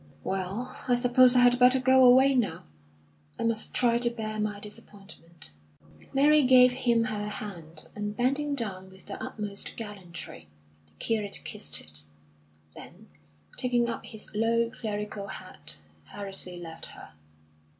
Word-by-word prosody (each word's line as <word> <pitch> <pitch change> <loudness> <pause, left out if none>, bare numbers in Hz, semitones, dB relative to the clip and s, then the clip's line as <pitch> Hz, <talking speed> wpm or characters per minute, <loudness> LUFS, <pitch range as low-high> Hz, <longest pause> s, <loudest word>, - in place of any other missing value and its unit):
"Well, 195 +7 -3
I 245 - +4
suppose 245 +1 +5
I 250 - +6
had 245 0 +5
better 250 +1 +6
go 260 0 +5
away 260 +2 +7
now. 245 -6 0 0.7
I - - -3
must 230 -1 0
try 235 -1 +2
to 240 0 +1
bear 215 -2 -4
my 210 -1 -2
disappointment." 195 - -11 0.6
Mary 295 +2 +5
gave 255 -1 +7
him 240 -2 +1
her 210 -2 -2
hand, 170 -7 -6
and, 210 0 -5
bending 280 +4 +1
down 190 -7 -3
with 190 0 -15
the - - -7
utmost 205 -2 -3
gallantry, 185 - -8 0.4
the 75 - -22
curate 210 - -1
kissed - - -1
it; 75 -1 -5 0.7
then, - - -12 0.5
taking 240 -1 +1
up 230 - -6
his 220 -1 -5
low, 230 +2 +1
clerical 210 -2 -5
hat, 75 - -4 0.2
hurriedly 195 -3 -7
left 165 -2 -7
her. - - -11
220 Hz, 140 wpm, -28 LUFS, 195-245 Hz, 0.7 s, away